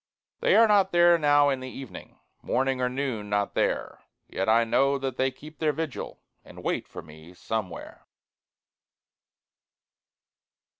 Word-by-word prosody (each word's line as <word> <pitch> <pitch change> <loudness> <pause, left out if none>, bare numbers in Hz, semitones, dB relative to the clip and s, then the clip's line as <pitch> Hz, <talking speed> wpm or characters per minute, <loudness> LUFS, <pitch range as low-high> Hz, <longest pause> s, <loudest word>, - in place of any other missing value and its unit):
They - - +3
are 230 - +6
not 200 -2 +3
there 175 0 +5
now 145 -1 +4
in 135 -2 -1
the 130 0 -7
evening 135 -1 -10 0.2
Morning 130 -1 -1
or 125 - +1
noon 125 -6 -4
not 105 0 -1
there; - - -1 0.3
Yet 95 +3 -2
I 115 +1 +5
know 135 +4 +2
that 135 -2 -4
they 130 0 +2
keep 155 +4 -14
their 155 -2 +1
vigil, 155 -2 -6 0.2
And - - -13
wait - - -2
for - - -9
me 80 +3 -15
Somewhere. 105 -2 -6
135 Hz, 145 wpm, -26 LUFS, 115-155 Hz, 0.3 s, are